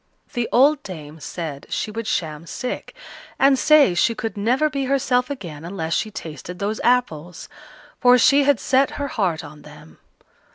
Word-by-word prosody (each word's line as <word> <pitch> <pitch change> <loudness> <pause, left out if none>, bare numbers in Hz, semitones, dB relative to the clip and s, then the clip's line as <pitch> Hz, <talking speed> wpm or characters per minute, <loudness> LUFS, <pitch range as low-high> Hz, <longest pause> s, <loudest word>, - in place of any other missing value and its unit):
The 240 -3 -2
old 280 +4 +4
dame 160 - -9
said 155 -3 -6
she 215 - -3
would 225 0 -5
sham 160 -3 -3
sick, 250 - -5 0.4
and 270 -1 +4
say 305 -10 +5
she 230 +6 +2
could 220 +1 -4
never 245 +9 +1
be 275 -2 -3
herself 255 -2 +1
again 170 - -7
unless 165 -2 -4
she 215 - 0
tasted 175 -4 -8
those 205 +3 -3
apples; 180 -9 0 0.5
for 250 -1 +6
she 280 +4 +5
had 280 -3 +3
set 270 +1 +2
her 285 -1 -3
heart 180 -10 -1
on 150 0 -12
them. 150 - -15
220 Hz, 165 wpm, -22 LUFS, 165-260 Hz, 0.5 s, for